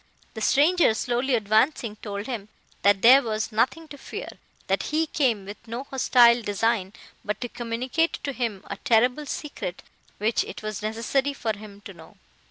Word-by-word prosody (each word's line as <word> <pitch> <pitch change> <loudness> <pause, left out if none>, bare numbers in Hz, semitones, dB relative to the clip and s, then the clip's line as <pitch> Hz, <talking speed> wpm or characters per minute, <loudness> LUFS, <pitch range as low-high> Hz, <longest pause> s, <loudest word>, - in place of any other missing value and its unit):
The 220 - -7
stranger 300 +1 +4
slowly 245 +3 0
advancing, 220 +2 +1
told 205 -1 -6
him, 225 -5 -5 0.3
that 200 -1 +3
there 260 +4 +9
was 220 -2 -3
nothing 260 +9 0
to 285 - -10
fear; - - -7 0.4
that - - 0
he 315 +2 +1
came 245 -10 0
with 205 +2 -8
no 235 +3 -5
hostile 245 -3 +4
design, 205 -2 0 0.3
but 210 0 -3
to 245 - -2
communicate 245 +7 -1
to 280 - -3
him 230 -7 -3
a - - -6
terrible 250 +6 +2
secret, 280 - -5 0.3
which 220 +3 +1
it - - -9
was 215 -1 -4
necessary 230 +6 -1
for 225 -5 -2
him 205 -1 -12
to - - -10
know. - - -16
230 Hz, 170 wpm, -25 LUFS, 215-265 Hz, 0.4 s, there